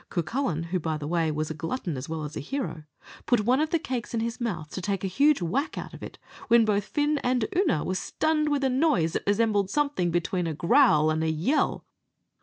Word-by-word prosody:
Cucullin, 175 - -1
who, 185 - +1
by 160 -1 -2
the 150 - -6
way, 165 -1 +1
was 155 +1 -2
a - - -2
glutton 165 - -4
as 130 +3 -6
well 160 -1 -3
as 150 0 -6
a - - -3
hero, 165 - -4 0.4
put 245 -3 +3
one 245 +5 +2
of 310 0 +1
the 335 - +2
cakes 250 -6 -4
in - - 0
his 230 +2 -3
mouth 165 -10 -3
to 185 - -5
take 195 +1 -2
a - - 0
huge 280 +3 +3
whack 270 - -1
out - - -6
of - - -11
it, - - -8 0.3
when 235 -2 +5
both 205 -1 +1
Fin 295 0 0
and 250 -3 +1
Oonagh 340 - +2
were 185 - -1
stunned 305 +10 0
with 285 -1 0
a 265 - +3
noise 255 - +2
that - - -3
resembled 205 -2 +2
something 280 -9 0
between 175 +1 -1
a 160 - -3
growl 165 - +4
and 160 +1 0
a 160 - +1
yell. 165 - 0
200 Hz, 230 wpm, -26 LUFS, 160-270 Hz, 0.4 s, when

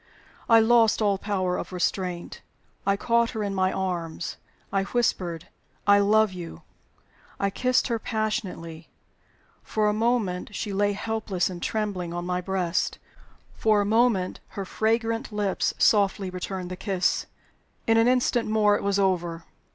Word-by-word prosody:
I 230 -1 +8
lost 225 0 +4
all 200 -3 +2
power 185 -3 -1
of - - -6
restraint; 180 -1 -2 0.5
I 200 0 +3
caught 235 +2 +2
her 220 - -3
in 200 -1 -2
my 185 -1 +1
arms; 170 -3 -3 0.4
I 195 - +2
whispered, 185 -7 -1 0.4
"I 205 0 +6
love 210 0 +3
you!" 170 - -8 0.8
I 200 0 0
kissed 255 +5 +1
her 230 -3 -1
passionately. 195 -8 -3 0.7
For 215 -1 0
a 210 - +2
moment 215 -4 0
she 205 0 -3
lay 205 +1 +2
helpless 210 -3 -2
and 175 -1 -7
trembling 190 -6 -2
on 175 0 -3
my 180 0 -1
breast; 185 -2 -1 0.6
for 215 -1 +2
a 205 - +1
moment 220 -3 +2 0.2
her 195 - -2
fragrant 225 +4 0
lips 205 -2 0
softly 200 -2 +3
returned 185 0 -5
the - - -3
kiss. 190 -3 0 0.6
In 225 0 +4
an 225 +1 +5
instant 245 -2 +2
more 210 -1 +4
it - - -2
was 200 0 +1
over. 175 -4 0
200 Hz, 150 wpm, -26 LUFS, 185-220 Hz, 0.8 s, I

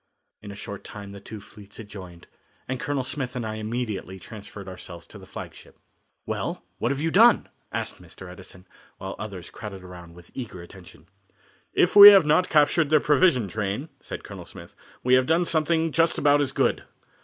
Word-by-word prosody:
In 105 - -10
a - - -9
short 100 0 -8
time 100 -1 -9
the 100 - -10
two 105 +2 -10
fleets 100 0 -14
had 115 - -9
joined, 90 -4 -11 0.4
and 130 0 -3
Colonel 140 -1 -2
Smith 130 0 -4
and 120 -2 -3
I 110 0 -4
immediately 110 -4 -4
transferred 100 +1 -11
ourselves 85 -2 -10
to - - -13
the - - -14
flagship. - - -11 0.5
"Well, - - -4 0.2
what - - 0
have 140 - -2
you 165 +1 0
done?" 230 +5 +5 0.2
asked - - -4
Mr. 95 - -12
Edison, 90 +1 -13 0.3
while 95 0 -6
others 100 -5 -8
crowded 100 -3 -9
around 90 -2 -12
with 85 0 -15
eager 110 -9 -7
attention. 85 -3 -15 0.7
"If 175 - +3
we 205 0 +13
have 195 -5 +7
not 180 +5 +3
captured 150 0 +3
their 155 0 +5
provision 150 - +3
train," 105 - -4
said - - -8
Colonel - - -10
Smith, - - -13 0.3
"we 125 - +2
have 130 0 +4
done 165 +2 +2
something 160 0 +1
just 165 +1 +2
about 145 0 +4
as 135 -2 0
good. - - 0
110 Hz, 190 wpm, -25 LUFS, 95-150 Hz, 0.7 s, we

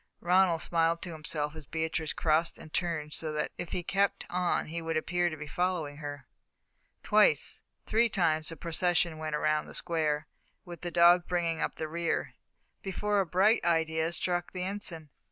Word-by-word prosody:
Ronald 175 -1 +3
smiled 165 0 +1
to 175 - -5
himself 150 -1 -2
as 155 -3 -10
Beatrice 160 -1 -2
crossed 160 +1 +1
and 155 - -13
turned 155 -4 -1
so 155 -1 -4
that 150 0 -2
if 175 -1 -5
he 180 - -2
kept 195 +3 0
on 180 0 +1
he 165 +2 -5
would 165 -1 -1
appear 175 +2 +1
to 155 - -7
be 150 - -6
following 165 -2 -1
her. 145 -1 -7 0.8
Twice, - - +3 0.2
three 230 +2 +3
times 160 -6 +1
the 165 - -5
procession 170 0 0
went 155 -1 -2
round 155 0 +1
the - - -9
square, 155 -3 0 0.4
with 175 -2 -9
the 175 - -3
dog 175 +1 +5
bringing 170 -2 0
up - - -1
the 155 - -4
rear, 170 +2 -2 0.5
before 205 +1 0
a 190 - +1
bright 195 +7 +3
idea 160 -1 +1
struck 175 +1 -2
the 180 -1 -3
Ensign. 180 -6 -4
165 Hz, 175 wpm, -30 LUFS, 155-180 Hz, 0.8 s, dog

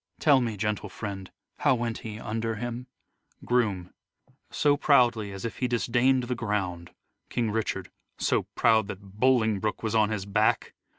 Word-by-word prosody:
Tell 140 -4 +5
me, 115 -4 -2
gentle 105 +1 -2
friend, 95 -2 -6 0.3
How - - +4
went 115 -1 -3
he 110 -2 -7
under 115 0 -2
him? 120 +2 -5 0.6
Groom: 105 -8 0 0.6
So 145 -1 +2
proudly 120 -8 +3
as 95 +2 -7
if 115 - -4
he 125 - +1
disdain'd 125 +3 +2
the 125 +1 -2
ground. 100 -7 -3 0.4
King 115 -3 -1
Richard: 110 0 -2 0.3
So - - 0
proud 110 -3 +4
that 100 0 -10
Bolingbroke 110 -5 +2
was 110 -1 -1
on 110 -2 +3
his 105 -3 -3
back 105 +2 +1
110 Hz, 155 wpm, -27 LUFS, 105-120 Hz, 0.6 s, Tell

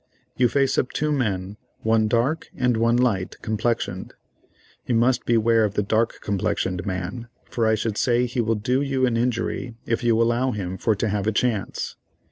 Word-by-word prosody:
You 125 - +4
face 135 0 +2
up 130 - -1
two 150 0 0
men, 100 -7 -1 0.2
one 110 -1 +2
dark 120 +8 0
and 125 -2 +2
one 115 +1 +2
light 105 -7 0
complexioned. 110 -3 -2 0.7
You 120 - +1
must 120 +3 +2
beware 115 -1 +3
of 105 -1 -1
the 105 - +1
dark 110 +3 0
complexioned 95 -2 -1
man, 95 +6 -4 0.2
for 115 -2 -1
I 110 - +4
should 110 -1 -2
say 120 0 +2
he 120 0 -1
will 115 0 +1
do 125 +6 0
you 135 -2 +1
an 120 -2 0
injury 120 0 -1
if 115 +2 -1
you 115 -1 +3
allow 120 +2 +2
him 95 -3 -4
for 110 - +2
to 105 +3 -1
have 105 0 -1
a - - +3
chance. 110 -2 -1
115 Hz, 185 wpm, -23 LUFS, 105-125 Hz, 0.7 s, You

